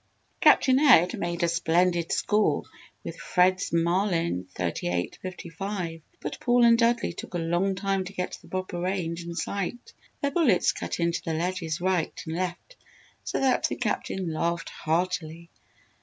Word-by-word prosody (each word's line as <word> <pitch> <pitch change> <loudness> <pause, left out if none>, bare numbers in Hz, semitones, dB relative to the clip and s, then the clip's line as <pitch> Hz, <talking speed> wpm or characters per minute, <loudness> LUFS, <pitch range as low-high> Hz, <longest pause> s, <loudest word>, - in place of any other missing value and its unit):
Captain 260 0 +5
Ed 245 - +6
made 175 0 -2
a - - +4
splendid 170 0 +1
score 210 0 +2 0.4
with - - -7
Fred's 185 0 +2
Marlin 170 - +1
38 90 0 -2
55 180 -1 -5 0.2
but - - -5
Paul 245 0 +4
and 230 0 +7
Dudley 235 0 +2
took - - -8
a - - +1
long 175 +4 0
time 195 0 -1
to 200 - -8
get 180 -1 -3
the - - -17
proper 185 -2 -4
range 175 -2 -2
and 170 0 -7
sight. 200 +6 -4 0.3
Their 280 - 0
bullets 275 - +3
cut - - -5
into 170 0 0
the 165 - -3
ledges 170 -1 -2
right 180 -2 0
and 160 0 -4
left 185 - -4 0.5
so - - -2
that 265 -1 +3
the - - -3
Captain 180 -4 -2
laughed 170 +1 -1
heartily. 165 0 -2
180 Hz, 155 wpm, -27 LUFS, 170-195 Hz, 0.5 s, and